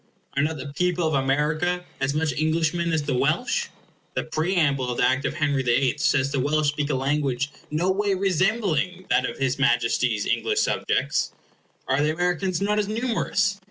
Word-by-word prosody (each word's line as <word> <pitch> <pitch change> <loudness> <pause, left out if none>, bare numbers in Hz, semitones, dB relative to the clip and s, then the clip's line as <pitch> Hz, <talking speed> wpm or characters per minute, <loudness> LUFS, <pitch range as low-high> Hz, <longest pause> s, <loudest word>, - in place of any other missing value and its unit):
Are 140 - +2
not 155 +2 -1
the 140 +1 -7
people 180 0 +1
of 155 - -1
America 150 +6 0
as 135 +1 0
much 155 -2 0
Englishmen 160 +3 0
as 160 -2 0
the 145 -1 -1
Welsh? - - +1 0.5
The - - 0
preamble 155 -6 0
of 125 - -3
the - - +4
Act 130 +1 0
of - - -2
Henry 145 -4 +1
the 120 -2 +2
Eighth 135 -2 0
says 140 -1 +2
the 140 - 0
Welsh 150 +2 +2
speak 145 0 -2
a 145 - +1
language 140 0 0 0.2
no 170 +5 +1
way 200 0 +1
resembling 185 -2 0
that 130 - +3
of 120 - -8
his 135 0 -1
Majesty's 120 -4 +2
English - - 0
subjects. - - 0 0.5
Are 135 - +2
the 150 +1 +2
Americans 180 +2 -1
not 210 +1 +1
as 205 - 0
numerous? 215 -3 0
150 Hz, 185 wpm, -24 LUFS, 135-180 Hz, 0.5 s, the